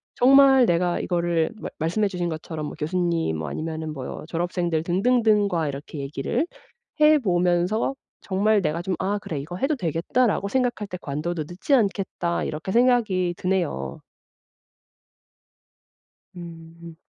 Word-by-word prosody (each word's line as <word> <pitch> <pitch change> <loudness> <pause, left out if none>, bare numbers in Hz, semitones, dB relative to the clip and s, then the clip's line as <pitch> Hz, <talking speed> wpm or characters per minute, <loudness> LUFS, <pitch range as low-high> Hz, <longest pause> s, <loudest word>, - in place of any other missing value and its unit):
정말 270 0 +6
내가 175 +1 +1
이거를 170 -2 0
말 - - -6
말씀해 175 +7 +1
주신 180 -3 -3
것처럼 160 -1 -5
뭐 - - -7
교수님 165 - 0
뭐 80 -2 -4
아니면은 160 - -4
뭐 135 +1 -6
졸업생들 175 -1 -1
등등등과 200 -2 +2
이렇게 140 +2 -7
얘기를 140 - -2 0.6
해 305 0 +7
보면서 180 +3 +1 0.3
정말 205 +2 +2
내가 155 +1 -1
좀 185 0 -1
‘아. 195 +2 0
그래 160 -6 -5
이거 165 +6 -6
해도 280 +8 0
되겠다라고 200 - 0
생각할 245 -5 0
때 180 - -6
관둬도 155 +3 -3
늦지 185 +11 -2
않겠다.‘ 195 -6 0
이렇게 160 +5 -4
생각이 225 -7 +2
드네요. 170 - -2 2.4
음. 165 -1 -10
175 Hz, 290 characters per minute, -24 LUFS, 165-210 Hz, 2.4 s, 해